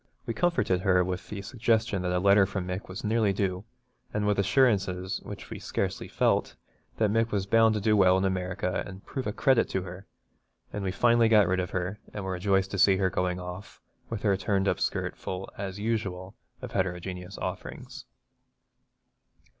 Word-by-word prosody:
We 115 - -2
comforted 115 - +1
her 90 -1 +3
with 90 +1 -4
the 100 -2 -5
suggestion 110 -2 0
that 90 0 -1
a 90 - +1
letter 100 +1 +5
from 95 -2 -3
Mick 90 +2 -4
was 95 - -7
nearly 110 -2 +2
due, 95 0 -2 0.5
and 105 0 -1
with 105 -1 +2
assurances, 100 -4 +2
which - - -9
we - - -5
scarcely - - -3
felt, - - +1 0.4
that 110 -2 +2
Mick 115 +1 +2
was 100 -3 -1
bound 110 +2 +4
to - - 0
do 105 +1 +3
well 95 -2 +5
in 95 - +1
America 90 0 -1
and 95 0 -11
prove 130 -3 -4
a - - 0
credit 130 +2 +3
to 95 - -1
her; 90 +2 -9 0.7
and 105 - -3
we 95 - -1
finally 115 +2 +4
got 105 -4 +6
rid 95 +1 +1
of 90 -1 -2
her, 90 +3 -3 0.2
and 105 - -4
were 95 - -2
rejoiced 95 +1 +1
to 100 - -3
see 95 0 +6
her 95 -1 +1
going 90 +1 -1
off, 90 +2 -8 0.3
with 115 -3 -4
her 100 -3 +3
turned 95 0 0
up - - +1
skirt - - -1
full 95 +1 -6
as 95 -1 -5
usual 100 -4 -3 0.3
of - - -6
heterogeneous 90 +1 -3
offerings. - - -6
95 Hz, 190 wpm, -28 LUFS, 90-105 Hz, 0.7 s, got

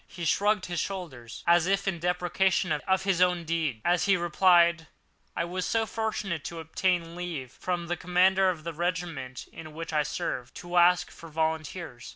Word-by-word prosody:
He 175 -2 -7
shrugged 205 +4 +2
his 175 -1 -3
shoulders, 145 -12 -6
as 170 0 +4
if 195 +1 +1
in 180 -3 -1
depreciation 180 +2 +1
of 190 +5 +1
his 190 -2 +1
own 180 -1 +3
deed, 160 -8 -1
as 175 -1 +3
he 195 -1 +4
replied: 170 -1 +4 0.5
"I - - 0
was 180 +1 -3
so 225 +3 +1
fortunate 215 -7 -3
as - - -6
to 170 - -7
obtain 170 +1 -1
leave 165 -8 -5
from 175 +3 -3
the 175 +1 -2
commander 185 +2 +3
of 165 -4 -3
the 170 0 -4
regiment 165 -6 -3
in 155 -1 -10
which 165 0 -6
I 150 - +3
served, 130 -3 -4
to 175 0 -4
ask 180 +1 +4
for 165 - -12
volunteers." 160 -3 -3
175 Hz, 185 wpm, -28 LUFS, 160-185 Hz, 0.5 s, as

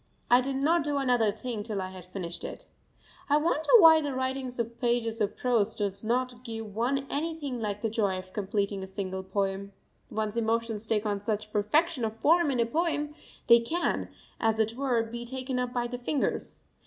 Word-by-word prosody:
I 245 +1 +7
did 270 +1 -2
not 310 +4 +2
do 290 -1 -1
another 245 -5 +3
thing 225 0 -5
till 210 -2 -3
I 185 0 -4
had 185 -2 -10
finished 180 -2 -5
it. - - -7 0.6
I 290 - +5
wonder 310 0 0
why 325 -5 +8
the 285 -3 -3
writing 260 0 -1
of 235 +1 -4
pages 235 -2 0
of 205 - 0
prose 230 -4 +1
does 200 -1 -2
not 245 +2 -1
give 225 -3 -6
one 265 +4 0
anything 290 -4 -3
like 205 0 -3
the 225 - +1
joy 205 -4 +1
of 185 0 -9
completing 200 -1 -1
a 190 - -6
single 190 -1 -4
poem. 195 +1 -2 0.4
One's 215 0 -2
emotions 225 -1 0
take 215 -1 +1
on 205 -1 0
such 210 +1 -3
perfection 280 +7 +2
of 220 0 -2
form 330 +5 +4
in 260 -3 0
a 235 - +4
poem; 300 +2 -1 0.3
they 235 0 +8
can, 325 +10 -1 0.3
as 225 -1 +2
it 220 0 +1
were, 250 -3 +1
be 235 +1 -6
taken 255 +1 -3
up 250 -1 -1
by 245 -1 -1
the 245 +1 -5
fingers. 265 +3 -2
235 Hz, 195 wpm, -28 LUFS, 210-270 Hz, 0.6 s, why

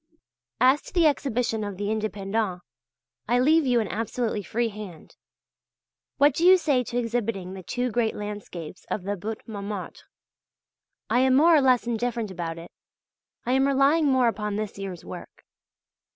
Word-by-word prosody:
As 260 +3 +5
to - - -13
the 345 -2 +4
Exhibition 245 -6 0
of 205 -2 -5
the 205 +1 -2
"Indépendents," 210 -3 -2 0.7
I 240 - +3
leave 305 +3 +4
you 245 -1 +3
an 220 - -1
absolutely 225 +1 -2
free 230 +4 -1
hand. 200 -6 -10 1.0
What 285 0 +5
do 325 - -2
you 370 +1 +8
say 285 -7 +1
to 240 - -4
exhibiting 230 -6 -2
the 190 - -8
two 245 +6 -2
great 230 -1 0
landscapes 205 -6 -7
of 200 - -3
the 200 +2 -2
Butte 215 +4 -6
Montmartre? 205 -3 -6 1.0
I 245 - +4
am 260 0 +4
more 325 +4 +6
or 300 - +5
less 255 -3 +3
indifferent 235 -2 -2
about 170 -2 -5
it; 170 +1 -10 0.7
I 245 - 0
am 265 +1 +3
relying 280 +3 +3
more 260 -3 +3
upon 210 -2 -2
this 210 -1 -4
year's 190 -4 -6
work. - - -10
225 Hz, 165 wpm, -25 LUFS, 205-255 Hz, 1.0 s, you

